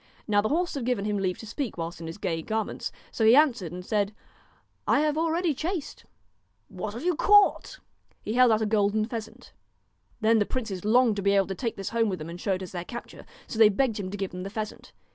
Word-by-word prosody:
Now 205 -2 +3
the 215 - -1
horse 350 +3 0
had 275 -5 -3
given 235 -4 -1
him 210 -1 0
leave 185 -2 -1
to - - -10
speak 230 0 -4
whilst 170 0 -5
in 165 - -6
his 165 - -7
gay 165 -5 -2
garments, 220 +5 -3 0.2
so 225 - -2
he 225 +2 +7
answered 250 - +3
and 180 0 -7
said: 205 0 0 0.4
' - - -39
I - - +3
have 300 -1 +1
already 330 +1 +1
chased.' 325 +3 -4 0.3
* 100 +2 -45
What 205 +3 -6
have 240 - -6
you 360 - +3
caught? 410 +5 +4 0.2
' - - -39
He 215 - -2
held 250 -1 +5
out 220 0 +2
a - - +1
golden 210 0 +2
pheasant. 225 -1 -8 0.7
Then 225 0 +4
the 205 - +2
princes 215 -8 -4
longed 225 0 +4
to - - -1
be 200 +1 +3
able 195 -1 +4
to 195 - -4
take 230 +4 -3
this 195 - -4
home 230 -1 +1
with 185 - -2
them 155 +1 -7
and 175 +1 -8
show 200 - 0
it 190 0 -3
as 180 - -8
their 175 -2 -4
capture. 240 +6 -9 0.2
So 225 - -6
they 220 -2 +8
begged 220 +1 0
him 190 -2 -4
to 205 - -5
give 195 -1 -3
them 180 - -6
the 195 - -5
pheasant. 215 0 -6
215 Hz, 255 wpm, -27 LUFS, 190-245 Hz, 0.7 s, they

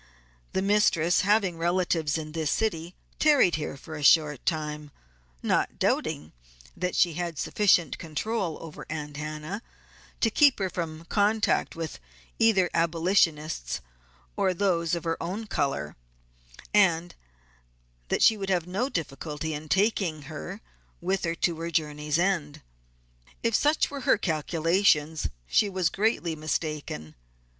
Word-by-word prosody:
The 190 - 0
mistress 195 -5 +3
having 195 -4 +2
relatives 170 -3 +1
in 155 -1 -6
this 160 -1 -2
city 175 -6 -1 0.2
tarried 290 - +5
here 150 -2 -3
a 155 -2 -6
short 150 -2 +4
time, 150 -2 -2 0.5
not - - +1
doubting 75 +2 -1 0.4
that 180 0 -2
she 175 -2 +3
had 170 -1 -4
sufficient 180 -5 +2
control 170 +2 -2
over 160 -2 -9
Aunt 150 -2 -5
Hannah 155 +7 -5 0.6
to 225 - +2
keep 285 +3 +5
her 190 -2 -2
from 165 -2 -5
contact 210 +3 +1
with 165 -2 -5 0.4
either 205 -5 +4
abolitionists 165 - +1 0.6
or 185 -1 +1
those 170 -3 +1
of 170 - -5
her 165 0 -2
own 195 +6 -4
color, 135 - -2 0.8
and 175 -4 +3 0.9
that - - +1
she 220 - +6
would 195 -1 -4
have 180 -3 +1
no 200 +9 -1
difficulty 155 - -4
in 150 +1 -7
taking 190 -6 +1
her 160 +7 -7 0.4
with 190 +2 -1
her 165 0 -1
to 170 -1 0
her 165 +1 -3
journey's 150 -2 -1
end. 165 -5 -1 0.8
If 230 - +1
such 295 +8 +2
were 280 -1 -5
her 260 -3 +3
calculations 160 -2 +1 0.2
she 200 - +2
was 185 -3 +1
greatly 195 -6 0
mistaken. 150 - -3
170 Hz, 135 wpm, -27 LUFS, 155-195 Hz, 0.9 s, she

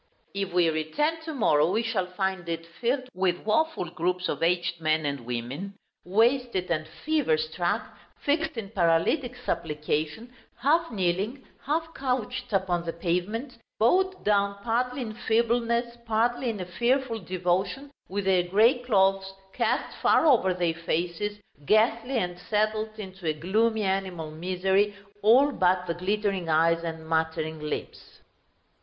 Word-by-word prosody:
If 195 -1 -2
we 175 -1 +3
return 295 - -1
to 320 - -4
morrow, 155 - +3
we 220 +5 +1
shall 215 -5 -1
find 190 -2 -2
it 165 0 -3
filled 245 +10 -2
with 185 -1 0
woful 220 - +1
groups 180 +2 -1
of 150 - -3
aged 175 0 +1
men 155 -1 +1
and 140 -1 -1
women, 130 +12 -4 0.3
wasted 225 -1 +1
and 155 -2 -1
fever 285 - 0
struck, 175 +7 -1 0.3
fixed 310 -1 0
in 205 -3 -5
paralytic 195 - +2
supplication, 155 +4 -3 0.2
half 320 +7 +2
kneeling, 200 +6 -1 0.2
half 325 +2 -1
couched 250 -1 -2
upon 185 -3 +1
the 165 -1 -4
pavement; 180 +10 -2 0.2
bowed 375 - +2
down, 200 -1 +2
partly 250 +3 0
in 220 -2 -6
feebleness, 235 +1 +1
partly 240 +3 +1
in 215 -3 -3
a 180 - -4
fearful 235 +5 0
devotion, 185 +8 -1 0.2
with 200 +1 -2
their 190 -2 +4
grey 215 +8 +4
clothes 195 -5 +2 0.2
cast - - 0
far - - +4
over 235 -11 +5
their 175 -2 +1
faces, 170 +5 -2 0.3
ghastly 230 +4 +3
and 180 -4 -2
settled 215 +2 0
into 190 -4 -7
a 155 - +2
gloomy 215 +8 +1
animal 190 -5 -2
misery, 190 +5 +1 0.3
all 255 +7 +6
but 180 -5 +2
the 170 - -1
glittering 195 0 -1
eyes 165 +1 +3
and 160 -1 -5
muttering 160 -1 -1
lips. 150 0 -6
195 Hz, 140 wpm, -27 LUFS, 175-235 Hz, 0.3 s, all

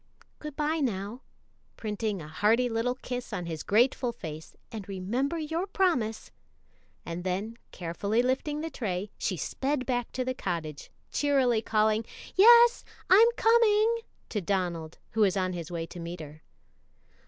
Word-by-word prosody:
Good 300 -2 -7
by, 310 +2 0
now," 220 -2 -2 0.6
printing 210 -4 -3
a - - -9
hearty 215 +10 +2
little 235 +2 0
kiss 250 -1 -6
on 175 - -3
his 160 -2 -4
grateful 245 +3 +2
face, 160 -7 -8 0.2
"and 210 -3 -7
remember 235 - -1
your 325 +4 -2
promise;" 300 - 0 0.7
and 170 +1 -5
then, 195 +5 -2 0.2
carefully 200 +7 -1
lifting 280 +4 -1
the 325 0 -4
tray, 200 -3 -3
she 185 - -1
sped 270 - -2
back 245 -2 -1
to 255 - -2
the 255 - -1
cottage, 165 - -4 0.2
cheerily 265 -6 +2
calling, 215 0 +2 0.3
"Yes, 470 +4 +7 0.3
I'm 430 +5 +8
coming," 455 0 +4 0.3
to 210 - -2
Donald, 170 -4 -2
who 225 - 0
was 200 -2 +4
on 185 -1 0
his 170 -3 -5
way 165 -1 -3
to 175 - -10
meet 170 +1 -6
her. 155 0 -10
225 Hz, 150 wpm, -28 LUFS, 185-275 Hz, 0.7 s, I'm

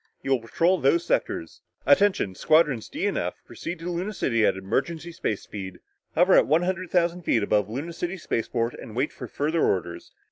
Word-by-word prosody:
You 135 - -2
will 135 - +4
patrol 170 +11 +1
those 340 0 +2
sectors. - - -2 0.2
Attention 200 - +3
Squadrons 150 - +2
D - - -3
and - - 0
F - - -3
proceed 175 - -6
to 175 +1 -3
Luna 180 +5 -3
City 115 - +1
at - - +1
emergency 140 - -2
space 110 -10 -3
speed, 95 -3 -7 0.4
hover 180 +3 +5
at - - +6
one 160 +4 +3
hundred 185 0 -2
thousand 175 0 +1
feet 115 -9 +1
above 105 0 +1
Luna 145 +9 -5
City 175 +3 -4
spaceport 115 -6 -2
and 110 - -10
wait 130 +5 0
for - - -8
further 155 +3 0
orders. 85 -2 -1
155 Hz, 190 wpm, -25 LUFS, 115-175 Hz, 0.4 s, at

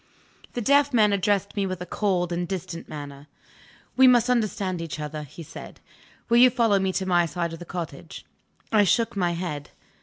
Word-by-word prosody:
The 240 - -3
deaf 280 +2 +3
man 210 -3 +4
addressed 200 0 0
me 200 -2 0
with 185 -1 -4
a 180 - -6
cold 180 -2 -1
and 175 0 -2
distant 180 -2 -6
manner. 145 -1 -8 0.7
"We 260 0 +7
must 245 -1 +5
understand 200 -6 -1
each 165 -2 -6
other," 150 0 -5
he 150 +3 -10
said. - - -11 0.5
"Will 235 - +3
you 250 +1 +8
follow 230 -5 +2
me 190 0 0
to 190 - -1
my 175 -2 +2
side 170 +2 -3
of 165 - -8
the 175 - -9
cottage?" 175 -1 -7 0.5
I 215 -2 +5
shook 225 +5 +1
my 175 -3 0
head. 165 -5 -5
185 Hz, 190 wpm, -25 LUFS, 170-215 Hz, 0.7 s, you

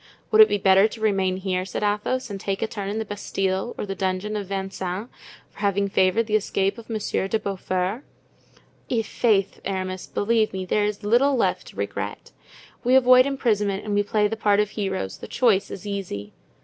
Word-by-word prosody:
"Would 435 0 +7
it 430 - +8
be - - +1
better 195 +1 +5
to 225 - -10
remain 195 -4 +1
here," 185 -1 -1
said 190 +2 -4
Athos, 210 +4 -1
"and 195 - -5
take 195 +1 -2
a - - 0
turn 200 -3 -5
in 210 - -3
the 220 - -2
Bastile 195 +1 -2
or - - -3
the 195 - -4
dungeon 195 +2 -2
of 205 -2 -3
Vincennes 195 +2 -4 0.4
for - - -17
having 200 -1 +1
favored 190 +4 +2
the 215 -1 0
escape 195 0 0
of 230 - -13
Monsieur 215 -3 -1
de 220 - +1
Beaufort? 195 +3 -2 0.9
I'faith, 220 -3 +1
Aramis, 185 -1 -3
believe 220 0 +1
me, 190 -1 -3
there 205 +3 +1
is 210 0 -3
little 245 +7 +3
left 245 - 0
to - - -13
regret. - - -5 0.5
We 250 +1 +4
avoid 255 0 +7
imprisonment 210 -7 0
and 210 - -2
we 205 - +3
play 210 0 +1
the 225 - -3
part 205 -2 +2
of 210 -1 +1
heroes; 190 - -3
the - - -8
choice 225 -6 +2
is 200 - -8
easy." 185 - -5
205 Hz, 195 wpm, -24 LUFS, 190-220 Hz, 0.9 s, it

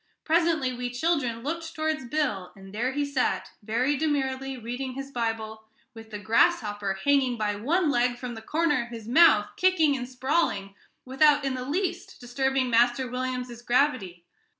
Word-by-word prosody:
Presently 320 -5 +2
we 245 0 -4
children 245 -3 -1
looked 325 +3 -4
towards 310 -3 -1
Bill, 235 -11 -1
and 195 0 -13
there 240 +5 -1
he 290 +2 -1
sat, 280 -3 -1
very 235 +7 0
demurely 270 -3 -1
reading 245 +3 -5
his 275 +1 -7
Bible, 225 -3 -3 0.3
with 225 -1 -12
the 210 - -6
grasshopper 205 -1 +1
hanging 275 -4 +3
by 210 -1 -1
one 305 - +1
leg 245 -1 +1
from 245 -1 -6
the 225 - -8
corner 300 +4 +1
of 235 - -7
his 225 -2 -9
mouth, 235 -6 +5
kicking 335 -6 +3
and 250 -1 -5
sprawling, 255 -7 -1 0.3
without 285 +2 +3
in 270 - 0
the 255 -1 -4
least 370 +5 -3
disturbing 265 +1 0
Master 240 +2 +3
William's 250 -1 -4
gravity. 240 -9 0
255 Hz, 160 wpm, -26 LUFS, 230-285 Hz, 0.3 s, mouth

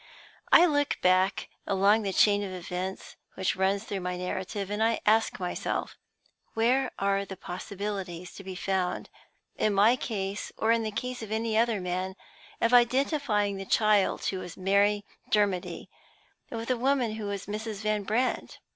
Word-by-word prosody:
I 350 - +9
look 290 -3 +1
back 185 +2 +3 0.2
along 200 +2 +4
the 200 -2 -2
chain 205 +1 +4
of 195 - -5
events 185 +1 -5 0.2
which 190 -1 0
runs 195 +1 +1
through 200 -3 -4
my 180 0 -3
narrative, 190 +2 -4
and 210 +1 -2
I 225 0 +2
ask 220 +1 +3
myself, 180 -1 -3 0.6
Where 245 +4 +2
are 195 0 +1
the 195 -1 -8
possibilities 185 -2 -5
to 195 - -10
be 190 -1 -7
found 185 -1 -2 0.5
(in 210 -2 +1
my 215 +5 +6
case, 205 -5 -4
or 220 - +2
in 230 0 +3
the 220 - -2
case 250 +4 -4
of 220 -1 -7
any 220 0 -1
other 225 -1 +2
man) 185 +1 -3 0.4
of 230 +1 +2
identifying 245 -4 +3
the 195 - -5
child 210 0 +2
who 190 - -1
was 180 -2 -8
Mary 200 +2 +2 0.2
Dermody 200 -4 0 0.6
with 230 0 -5
the 255 - +2
woman 255 -2 +1
who 215 - -5
was 200 -2 -4
Mrs. 215 0 -5
Van 215 -1 0
Brandt? 225 +6 -1
205 Hz, 165 wpm, -28 LUFS, 190-225 Hz, 0.6 s, I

